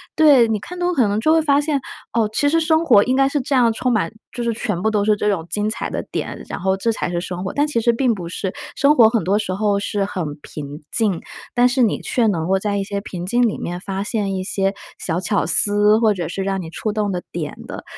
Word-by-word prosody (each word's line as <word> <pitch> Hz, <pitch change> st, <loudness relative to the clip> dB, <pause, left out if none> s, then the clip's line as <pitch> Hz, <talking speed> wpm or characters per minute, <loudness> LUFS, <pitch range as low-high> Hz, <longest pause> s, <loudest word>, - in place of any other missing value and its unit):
对， 285 Hz, -7 st, +6 dB
你 220 Hz, -2 st, 0 dB
看 355 Hz, -, -9 dB
多 355 Hz, -, +1 dB
了 -, -, 0 dB
可 245 Hz, -7 st, +3 dB
能 205 Hz, +1 st, 0 dB
就 310 Hz, +8 st, +2 dB
会 325 Hz, -, +5 dB
发 285 Hz, -1 st, +3 dB
现， 295 Hz, -1 st, 0 dB, 0.3 s
哦， 230 Hz, -2 st, +2 dB
其 285 Hz, +5 st, +2 dB
实 330 Hz, +3 st, +3 dB
生 320 Hz, 0 st, +2 dB
活 215 Hz, -9 st, +6 dB
应 255 Hz, -, 0 dB
该 270 Hz, 0 st, +3 dB
是 290 Hz, -, 0 dB
这 275 Hz, -, -3 dB
样 240 Hz, -3 st, +4 dB
充 245 Hz, +3 st, 0 dB
满 200 Hz, -7 st, 0 dB, 0.2 s
就 240 Hz, -, -4 dB
是 235 Hz, -, 0 dB
全 210 Hz, -6 st, -3 dB
部 220 Hz, -, +2 dB
都 210 Hz, -2 st, +1 dB
是 215 Hz, 0 st, +4 dB
这 210 Hz, 0 st, 0 dB
种 180 Hz, -6 st, -1 dB
精 210 Hz, +5 st, -1 dB
彩 220 Hz, -, -4 dB
的 -, -, -3 dB
点， -, -, -4 dB
然 -, -, -4 dB
后 190 Hz, +1 st, +1 dB
这 210 Hz, +4 st, 0 dB
才 210 Hz, -, -3 dB
是 175 Hz, -, -1 dB
生 180 Hz, 0 st, -5 dB
活， 190 Hz, -, -4 dB
但 290 Hz, +1 st, +1 dB
其 295 Hz, -6 st, 0 dB
实 235 Hz, +1 st, +3 dB
并 245 Hz, 0 st, +2 dB
不 175 Hz, -4 st, -6 dB
是。 185 Hz, +1 st, -4 dB, 0.2 s
生 285 Hz, +2 st, +4 dB
活 230 Hz, -5 st, +7 dB
很 230 Hz, -5 st, 0 dB
多 195 Hz, +4 st, +2 dB
时 205 Hz, -3 st, -2 dB
候 200 Hz, +1 st, +1 dB
是 200 Hz, 0 st, -1 dB
很 190 Hz, -2 st, -3 dB, 0.2 s
平 145 Hz, 0 st, -8 dB
静， 205 Hz, -7 st, 0 dB, 0.4 s
但 245 Hz, 0 st, +5 dB
是 250 Hz, +1 st, +1 dB
你 225 Hz, -4 st, +2 dB
却 240 Hz, -3 st, +1 dB
能 170 Hz, -6 st, 0 dB
够 190 Hz, +1 st, +2 dB
在 205 Hz, 0 st, -1 dB
一 200 Hz, -, -1 dB
些 200 Hz, 0 st, -4 dB
平 180 Hz, -3 st, -6 dB
静 240 Hz, +6 st, +1 dB
里 215 Hz, -, -3 dB
面 175 Hz, +1 st, -4 dB
发 195 Hz, 0 st, -4 dB
现 205 Hz, -3 st, -2 dB
一 185 Hz, -, -2 dB
些 195 Hz, 0 st, 0 dB, 0.3 s
小 165 Hz, -1 st, -2 dB
巧 190 Hz, +3 st, 0 dB
思， 205 Hz, +5 st, +3 dB
或 220 Hz, -2 st, +3 dB
者 175 Hz, -5 st, -4 dB
是 190 Hz, +3 st, -3 dB
让 195 Hz, 0 st, -1 dB
你 165 Hz, -, -7 dB
触 215 Hz, +6 st, -3 dB
动 210 Hz, -2 st, -1 dB
的 180 Hz, -1 st, -2 dB
点 155 Hz, -4 st, -4 dB
的， -, -, -7 dB
210 Hz, 295 characters per minute, -20 LUFS, 190-240 Hz, 0.4 s, 活